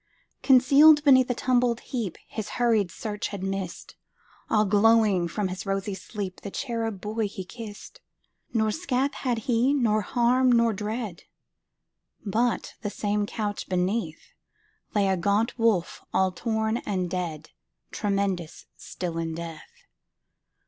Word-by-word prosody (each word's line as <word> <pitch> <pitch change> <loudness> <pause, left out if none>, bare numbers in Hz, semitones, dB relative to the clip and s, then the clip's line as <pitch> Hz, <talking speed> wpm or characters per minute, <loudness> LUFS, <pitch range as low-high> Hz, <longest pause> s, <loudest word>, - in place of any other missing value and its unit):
Concealed 280 +3 +6
beneath 260 -3 +6
a 245 - 0
tumbled 245 -1 +1
heapHis 220 -1 -4
hurried 225 -6 +2
search 210 +3 -4
had 200 -2 -6
missed, 195 -2 -5 0.5
All 215 -1 +3
glowing 210 -3 +4
from 195 +3 -2
his 185 0 -5
rosy 195 +1 -2
sleep, 190 0 -6
The 200 - -6
cherub 225 -2 -3
boy 215 +2 -2
he 195 -2 -7
kissed. 225 - -10 0.5
Nor 220 -2 +1
scath 275 -2 -1
had 250 -4 -1
he, 250 +3 +2
nor 220 -5 +2
harm, 250 +3 +2
nor 235 -1 +4
dread, 210 -2 -5 1.0
But, 230 +4 0
the 210 - -2
same 205 0 -1
couch 210 -2 -4
beneath, 180 -2 -2 0.6
Lay 200 -1 +3
a 190 - +2
gaunt 205 +7 0
wolf, 220 -7 +1
all 190 -1 +2
torn 220 +3 -1
and 185 -6 -2
dead, 175 -4 -4 0.4
Tremendous 195 -5 -2
still 170 -2 -5
in 165 -1 -3
death. 165 -2 -9
210 Hz, 130 wpm, -26 LUFS, 190-235 Hz, 1.0 s, Concealed